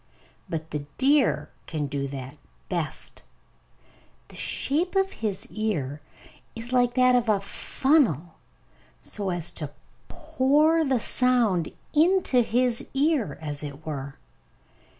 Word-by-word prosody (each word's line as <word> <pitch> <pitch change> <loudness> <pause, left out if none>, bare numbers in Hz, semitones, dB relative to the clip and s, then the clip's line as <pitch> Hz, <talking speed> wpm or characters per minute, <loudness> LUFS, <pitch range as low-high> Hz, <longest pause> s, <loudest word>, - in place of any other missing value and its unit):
But 160 -1 -4
the 150 - -2 0.2
deer 275 +1 +2 0.2
can 155 -2 -2
do 140 0 -3
that 135 -1 -8 0.3
best. - - -3 1.1
The - - -13
shape 335 +8 0
of 385 0 +2
his 210 -4 -3
ear 155 -10 -2 0.5
is 235 +2 -5
like 245 -1 +3
that 255 -1 +5
of 240 -2 +2
a 205 -2 +3
funnel, 200 - +1 0.6
so 200 -2 -3
as 175 -2 0
to 150 -3 -4 0.4
pour 315 0 +2
the 265 -4 +1
sound 230 -9 +2 0.2
into 325 -4 +4
his 240 +1 +1
ear, 285 - +1
as 145 -1 -2
it 145 +2 -8
were. 140 -3 -5
230 Hz, 120 wpm, -26 LUFS, -, 1.1 s, that